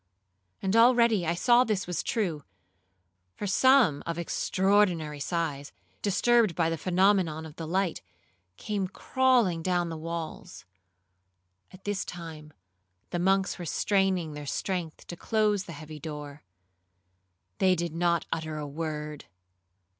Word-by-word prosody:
And 190 +2 +1
already 235 -5 +5
I 170 - +1
saw 240 +7 +5
this 215 -5 -1
was 175 -2 -2
true, 175 -10 -2 0.9
for - - -5
some 230 - +4
of 170 0 -2
extraordinary 175 -3 +1
size, 150 -3 -3 0.3
disturbed 215 -1 +3
by 165 -1 +1
the 165 - -1
phenomenon 185 -4 +2
of 155 -1 -11
the 165 - -5
light, 185 +1 0 0.6
came 200 -3 -2
crawling 240 -7 +2
down 175 0 0
the 165 - -5
walls. 165 0 -6 1.1
All 185 - -13
this 205 -2 -2
time 160 -3 -9 0.6
the 175 - -1
monks 190 +1 +1
were 175 - -5
straining 190 -2 +1
their 150 -1 -7
strength 175 0 -3
to 175 - -7
close 210 0 +1
the - - -8
heavy 155 0 -9
door; 150 -2 -7 1.2
they 185 -1 +4
did 170 -2 -3
not 170 0 +1
utter 160 -1 -4
a 150 - -4
word. 150 0 -5
175 Hz, 130 wpm, -28 LUFS, 160-195 Hz, 1.2 s, already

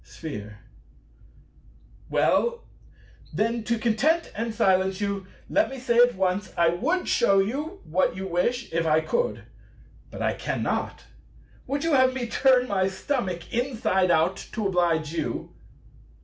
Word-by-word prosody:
Sphere. 105 -10 -8 1.5
Well, 475 0 +1 0.7
then, 225 +7 -1
to 235 -1 0
content 245 +10 +1
and 230 +2 -3
silence 190 -2 +2
you, 200 -2 -3 0.2
let 310 - +2
me 270 - -7
say 240 -2 +1
at 245 0 +5
once, 190 +1 -1
I 170 -1 +4
would 295 - -1
shew 195 0 +3
you 295 - -2
what 180 +4 0
you 190 +1 -5
wish 200 +7 -1
if 165 0 0
I 155 0 +4
could; 485 - -1 0.7
but - - -6
I - - +1
cannot. - - -3 0.6
Would 280 +1 -2
you 330 -1 +1
have 260 -1 +4
me 255 -2 -2
turn 255 +1 +3
my 190 -3 +1
stomach 190 - -3
inside 225 -7 +1
out 170 +3 +3 0.2
to 220 -3 -2
oblige 170 -5 +1
you? 170 - -4
210 Hz, 140 wpm, -25 LUFS, 185-255 Hz, 1.5 s, at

